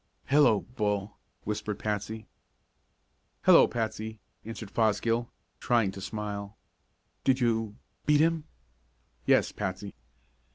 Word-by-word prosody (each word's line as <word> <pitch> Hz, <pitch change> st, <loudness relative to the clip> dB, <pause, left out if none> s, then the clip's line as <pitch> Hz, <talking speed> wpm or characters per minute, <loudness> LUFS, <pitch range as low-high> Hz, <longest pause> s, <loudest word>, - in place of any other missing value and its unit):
"Hello, 140 Hz, -7 st, +5 dB
Bull!" 105 Hz, -4 st, -2 dB, 0.2 s
whispered 105 Hz, 0 st, -3 dB
Patsy. 105 Hz, +1 st, -3 dB, 1.2 s
"Hello, -, -, +8 dB
Patsy!" 110 Hz, -1 st, -3 dB, 0.2 s
answered 110 Hz, -2 st, -7 dB
Fosgill, 115 Hz, +1 st, +1 dB, 0.3 s
trying 115 Hz, -5 st, +2 dB
to 95 Hz, -, -9 dB
smile. 105 Hz, 0 st, -5 dB, 0.7 s
"Did 130 Hz, 0 st, +3 dB
you 115 Hz, -3 st, 0 dB, 0.3 s
beat 150 Hz, -1 st, +5 dB
him?" 160 Hz, 0 st, +2 dB, 0.8 s
"Yes, -, -, +4 dB
Patsy." 100 Hz, 0 st, -4 dB
110 Hz, 95 wpm, -29 LUFS, 105-120 Hz, 1.2 s, Hello